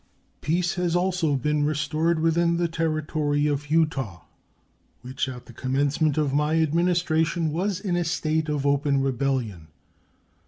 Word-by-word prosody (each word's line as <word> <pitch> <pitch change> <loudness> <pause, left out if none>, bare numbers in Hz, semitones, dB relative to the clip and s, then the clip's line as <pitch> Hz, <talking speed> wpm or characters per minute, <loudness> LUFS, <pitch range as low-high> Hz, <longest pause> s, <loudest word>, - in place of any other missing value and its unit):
Peace 175 +3 0
has 175 -2 -1
also 175 -4 +1
been 150 +3 0
restored 155 +2 0
within 170 +1 +2
the 175 0 +1
Territory 155 -2 -1
of 145 0 -1
Utah, 135 - 0 0.8
which 130 +2 -3
at 125 -1 -9
the 120 - -13
commencement 140 +4 0
of 145 -3 +1
my 150 +2 +2
Administration 165 0 +1
was 185 +4 -1
in 195 -4 -2
a 175 - +1
state 160 -1 -1
of 145 -2 -1
open 140 -1 +2
rebellion. 125 - -2
155 Hz, 140 wpm, -25 LUFS, 140-170 Hz, 0.8 s, within